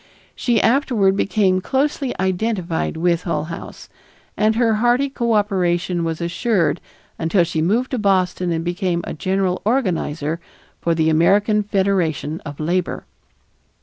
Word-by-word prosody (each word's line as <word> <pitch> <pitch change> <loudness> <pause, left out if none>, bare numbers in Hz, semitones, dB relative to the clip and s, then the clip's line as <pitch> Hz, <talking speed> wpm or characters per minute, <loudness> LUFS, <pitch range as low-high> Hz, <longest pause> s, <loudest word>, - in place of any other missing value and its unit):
She 235 -3 +1
afterward 230 -7 +2
became 195 -2 +1
closely 275 +2 -1
identified 185 -3 -1
with 170 0 +1
Hull 160 -4 -2
House, 165 +1 -8 0.5
and 215 +1 +2
her 225 -2 +2
hearty 245 +4 +3
cooperation 190 -7 0
was 165 -1 -2
assured 175 0 0 0.4
until 170 +2 +2
she 165 -2 -2
moved 225 +10 +1
to 255 - -1
Boston 185 -3 +1
and 165 0 -2
became 175 0 -1
a - - -5
general 185 +2 -1
organizer 170 - -1 0.4
for 170 -1 +1
the 160 0 +2
American 205 +6 +3
Federation 190 -6 -1
of 145 -1 -8
Labor. 175 +3 -1
185 Hz, 130 wpm, -20 LUFS, 170-215 Hz, 0.5 s, hearty